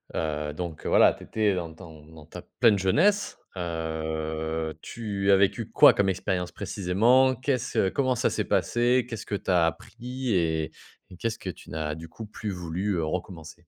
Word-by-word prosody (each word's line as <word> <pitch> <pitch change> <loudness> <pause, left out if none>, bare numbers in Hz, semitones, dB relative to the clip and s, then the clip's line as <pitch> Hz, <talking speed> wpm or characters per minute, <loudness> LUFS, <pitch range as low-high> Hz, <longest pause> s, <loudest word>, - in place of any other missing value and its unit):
Heu, 75 -2 -2
donc 85 -1 -6
heu, - - -1
voilà, - - +6
tu - - -13
étais 105 -2 +1
dans 85 -3 -4
ton 80 -3 -13
dans 80 -2 -14
ta - - -9 0.2
pleine 105 -4 +6
jeunesse. 190 - +2 0.2
Heu, 80 -1 -3
tu 100 -4 -3
as - - +8
vécu 100 0 +1
quoi - - +8
comme 100 -1 +1
expérience 90 -1 -2
précisément? 120 +8 +2
Qu'est-ce 130 -6 0
comment 130 +2 +1
ça - - +1
s'est - - -2
passé? 120 +1 +2
Qu'est-ce 115 -1 -6
que 105 - -3
tu 95 - -2
as 85 -2 +4
appris 125 - -4
et 80 -2 0 0.4
et 90 - -11
qu'est-ce 115 +1 -3
que 95 - -5
tu - - -10
n'as 75 -1 -3
du 80 +1 -9
coup 110 - -9
plus 105 -1 -5
voulu, 90 +3 -3
heu, 85 - -1
recommencer? 80 -1 -5
90 Hz, 185 wpm, -26 LUFS, 80-110 Hz, 0.4 s, as